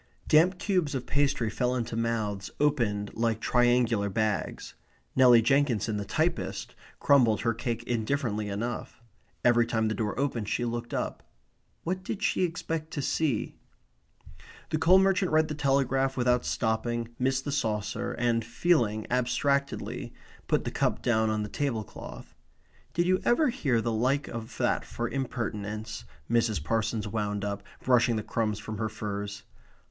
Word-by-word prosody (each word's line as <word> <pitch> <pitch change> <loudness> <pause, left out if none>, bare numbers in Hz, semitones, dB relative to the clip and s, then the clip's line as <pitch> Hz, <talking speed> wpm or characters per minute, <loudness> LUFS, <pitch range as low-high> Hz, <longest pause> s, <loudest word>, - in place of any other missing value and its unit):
Damp 175 +4 +5
cubes 180 -7 0
of 125 -2 -3
pastry 140 -4 +1
fell 125 +2 0
into 115 -2 -3
mouths 110 -4 -1
opened 115 -9 +1
like 115 -1 0
triangular 120 -4 +2
bags. 105 -4 -2 0.4
Nelly 125 -3 +7
Jenkinson, 120 -5 +2
the 100 - -3
typist, - - -1 0.3
crumbled 120 -7 +4
her 115 -1 +1
cake 120 0 -3
indifferently 115 -3 -1
enough. 115 +4 -4 0.5
Every 120 -1 +5
time 110 -2 +1
the - - 0
door 110 +1 -2
opened 120 -7 -1
she 120 - 0
looked 120 0 -4
up. - - -3 0.6
What 185 +2 -2
did 205 +2 -4
she 195 - +1
expect 165 -2 -2
to 145 - -2
see? 145 -8 0 1.2
The 155 - +1
coal 180 +4 +6
merchant 190 -1 +3
read 155 0 +3
the - - -2
Telegraph 135 -2 +1
without 125 0 +2
stopping, 115 +1 -1
missed 130 +1 +1
the 145 - -2
saucer, 105 -7 -1
and, 120 -1 +1
feeling 115 -6 +1
abstractedly, 140 +3 0 0.3
put - - +2
the - - -3
cup - - 0
down 110 -2 +2
on 110 -1 0
the - - -4
table 120 -2 -2
cloth. - - -10 0.6
"Did 175 - +2
you 185 +1 +2
ever 295 +5 +3
hear 135 - +1
the 115 0 -1
like 130 +6 +1
of 115 -1 -7
that - - +1
for 120 - -4
impertinence?" 110 - -4 0.2
Mrs. 115 -8 +1
Parsons 110 +2 -1
wound 105 -1 -2
up, 100 -1 -3 0.2
brushing 120 -2 +4
the 110 - -2
crumbs 110 -2 -1
from 105 0 -6
her 110 -1 -1
furs. 100 -1 -5
120 Hz, 150 wpm, -28 LUFS, 110-140 Hz, 1.2 s, Nelly